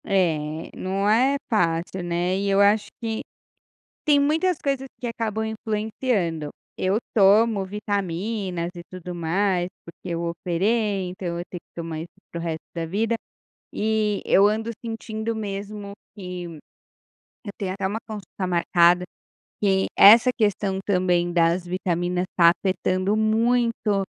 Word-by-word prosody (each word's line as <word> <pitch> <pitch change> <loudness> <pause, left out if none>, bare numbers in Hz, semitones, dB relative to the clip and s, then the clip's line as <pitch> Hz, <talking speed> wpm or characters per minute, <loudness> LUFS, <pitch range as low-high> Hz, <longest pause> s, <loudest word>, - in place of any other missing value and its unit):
É, 160 -4 0
não 195 +2 -1
é 255 +6 +4
fácil, 175 -3 0
né. 175 +1 0
E 200 +1 -1
eu 195 0 +3
acho 205 +1 +4
que 225 -2 -3 0.8
tem 290 -2 +5
muitas 315 +4 +2
coisas 275 -1 -1
que 245 - -4
acabam 220 -2 -2
influenciando. 215 - -2 0.3
Eu 190 +3 +1 0.2
tomo 210 0 +5
vitaminas 195 -2 -3
e 175 - -8
tudo 180 -1 -7
mais, 175 +2 0 0.2
porque 170 +2 -11
eu 165 - -2
operei, 190 +4 0
então 180 -2 -4
eu - - -3
tenho 180 - -7
que - - -72
tomar 165 -2 -5
isso 165 - -7 0.2
para 170 - -5
o - - -5
resto 160 -1 -4
da 165 -1 -2
vida. 215 +7 0 0.6
E 215 -1 0
eu 200 +1 +5
ando 220 +2 -1 0.2
sentindo 225 0 -4
mesmo 205 -1 -5 0.2
que, 180 -2 -6 1.0
eu 205 - -6
tenho 190 -3 -2
até 190 0 -2
uma 205 +3 -2
consulta 200 -3 -5
marcada, 175 0 +4 0.6
que 190 -2 +3
essa 230 +5 +9
questão 205 -3 0
também, 180 -3 +1
das 170 +1 +2
vitaminas, 180 0 -1
está 170 -1 +6
afetando 185 +1 +1
muito 220 -2 +2
195 Hz, 140 wpm, -24 LUFS, 175-220 Hz, 1.0 s, essa